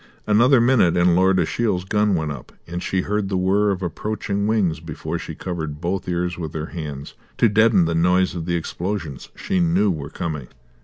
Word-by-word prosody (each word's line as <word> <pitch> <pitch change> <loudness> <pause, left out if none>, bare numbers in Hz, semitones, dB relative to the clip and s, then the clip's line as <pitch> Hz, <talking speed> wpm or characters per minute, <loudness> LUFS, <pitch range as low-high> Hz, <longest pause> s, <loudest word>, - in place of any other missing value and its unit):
Another 120 +5 +5
minute 115 -8 +3
and 85 0 +4
Lord 95 +1 +4
Ashiel's 100 -5 0
gun 105 0 +2
went 80 -3 -1
up; 65 -4 -9 0.3
she 95 +1 -1
heard 105 0 -2
the 95 - 0
whirr 100 +3 +2
of 95 -1 -2
approaching 100 +3 -2
wings 95 -8 +1
before 80 -2 -5
she - - -7
covered 80 -5 -5
both 90 +3 -3
ears 90 0 -2
with 80 -2 -5
her 80 0 -3
hands 75 -5 -6 0.2
to 115 - +5
deaden 110 -3 +4
the 85 - -1
noise 90 +3 +2
of 85 -2 -5
the 85 - 0
explosions 85 -3 -4
she 95 - -1
knew 90 +4 +3
were 75 -4 -5
coming. 75 -6 -5
90 Hz, 190 wpm, -22 LUFS, 80-100 Hz, 0.3 s, Another